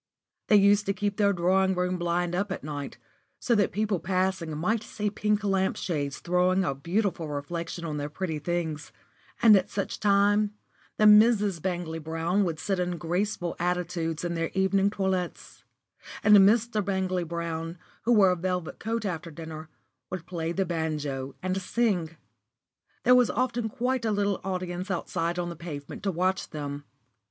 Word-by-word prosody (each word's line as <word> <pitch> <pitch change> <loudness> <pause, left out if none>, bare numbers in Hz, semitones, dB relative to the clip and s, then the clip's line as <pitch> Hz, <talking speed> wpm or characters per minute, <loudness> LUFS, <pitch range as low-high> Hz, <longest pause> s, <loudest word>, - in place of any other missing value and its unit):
They 215 - +5
used 205 0 +5
to 195 - +2
keep 205 +1 -2
their 200 -1 +4
drawing 190 +1 +2
room 180 0 -1
blind 175 0 0
up 195 +2 -1
at 190 - -4
night, 145 -2 -5 0.4
so 240 - +1
that 205 -4 +2
people 210 -2 0
passing 185 -3 -1
might 210 +8 0
see 210 -2 -3
pink 210 0 0
lamp 195 -1 +1
shades 145 -6 -2
throwing 180 +2 +2
a 140 - 0
beautiful 170 +4 -1
reflection 165 +4 -4
on 150 -2 -3
their 145 0 -3
pretty 160 0 -3
things; 160 -1 -3 0.5
and 220 -2 +9
at 190 -2 +2
such 200 - -3
times 205 0 +3 0.5
the 215 - +4
Misses 210 -3 +6
Bangley 175 -2 -3
Brown 165 +5 0
would 165 -3 -2
sit 195 +3 -2
in 180 -1 -1
graceful 175 +1 -2
attitudes 175 -2 -1
in 170 - -1
their 165 -1 -1
evening 195 +1 +3
toilets, 190 -3 -3 0.6
and 210 0 +7
Mr. 215 +2 +4
Bangley 190 -2 -1
Brown, 165 0 -4 0.2
who 235 - 0
wore 195 -4 +6
a - - +1
velvet 180 -1 -3
coat 225 0 -2
after 170 -3 -3
dinner, 160 0 -8 0.4
would 180 -2 -5
play 165 -2 -3
the 190 +2 0
banjo 150 -5 -3
and 185 +1 -1
sing. 180 -7 0 0.9
There 250 - +6
was 250 -2 +5
often 240 -1 -1
quite 250 +2 -1
a 220 - +1
little 205 -1 0
audience 185 0 -3
outside 170 -1 -2
on 175 -1 -2
the 170 - -6
pavement 150 -4 -7
to 195 - 0
watch 185 +2 0
them. 145 -1 -6
180 Hz, 165 wpm, -27 LUFS, 165-200 Hz, 0.9 s, and